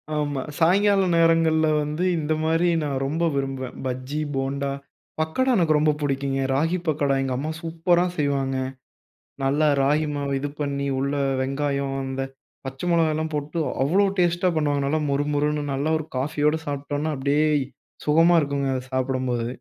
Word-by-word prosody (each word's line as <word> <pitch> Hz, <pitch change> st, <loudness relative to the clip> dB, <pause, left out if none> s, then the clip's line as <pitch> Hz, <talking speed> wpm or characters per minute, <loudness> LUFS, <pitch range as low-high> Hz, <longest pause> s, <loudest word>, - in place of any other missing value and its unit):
ஆமா. 145 Hz, -2 st, -1 dB, 0.2 s
சாயங்கால 195 Hz, +4 st, +4 dB
நேரங்கள்ல 165 Hz, -1 st, +4 dB, 0.2 s
வந்து 150 Hz, +4 st, -3 dB
இந்தமாரி 160 Hz, +2 st, +1 dB
நான் 140 Hz, -2 st, -2 dB
ரொம்ப 160 Hz, +5 st, -1 dB
விரும்புவேன். 135 Hz, -1 st, -3 dB
பஜ்ஜி, 130 Hz, +3 st, -3 dB, 0.2 s
போன்டா, 135 Hz, +1 st, -1 dB, 0.5 s
பக்கோடா 255 Hz, +12 st, +1 dB
எனக்கு 160 Hz, -4 st, +3 dB
ரொம்ப 155 Hz, 0 st, +3 dB
பிடிக்குங்க. 135 Hz, -1 st, -1 dB
ராகி 165 Hz, +6 st, +1 dB
பக்கோடா 145 Hz, -3 st, +1 dB
எங்க 130 Hz, -, -2 dB
அம்மா 155 Hz, +4 st, -3 dB
சூப்பரா 170 Hz, +1 st, +1 dB
செய்வாங்க. 140 Hz, -2 st, 0 dB, 0.9 s
நல்லா 145 Hz, +3 st, +2 dB
ராகி 150 Hz, +3 st, +2 dB
மாவு 140 Hz, -1 st, -2 dB
இது 145 Hz, -, -2 dB
பண்ணி 140 Hz, -1 st, -2 dB
உள்ள 140 Hz, +1 st, -1 dB, 0.3 s
வெங்காயம் 140 Hz, 0 st, -1 dB
அந்த 135 Hz, 0 st, -3 dB, 0.4 s
பச்சை 135 Hz, +6 st, -5 dB
மொளகால்லாம் 160 Hz, -1 st, +1 dB
போட்டு 150 Hz, +3 st, -3 dB, 0.2 s
அவ்வளவு 195 Hz, +7 st, +2 dB
டேஸ்ட்டா 175 Hz, +1 st, +2 dB
பண்ணுவாங்க. 145 Hz, -2 st, +1 dB
நல்லா 155 Hz, +3 st, +1 dB
மொறு 140 Hz, +1 st, 0 dB
மொறுன்னு 150 Hz, 0 st, 0 dB
நல்லா 145 Hz, +4 st, -1 dB
ஒரு 155 Hz, -, -7 dB
காஃபியோட 150 Hz, +3 st, +1 dB
சாப்பிட்டோன்னா, 145 Hz, +2 st, -2 dB
அப்பிடியே 145 Hz, +3 st, +2 dB, 0.6 s
சுகமா 165 Hz, +3 st, +5 dB
இருக்குங்க. 140 Hz, -1 st, -1 dB
அத 130 Hz, -, -3 dB
சாப்பிடும்போது. 130 Hz, -2 st, -1 dB
145 Hz, 140 wpm, -24 LUFS, 140-160 Hz, 0.9 s, சுகமா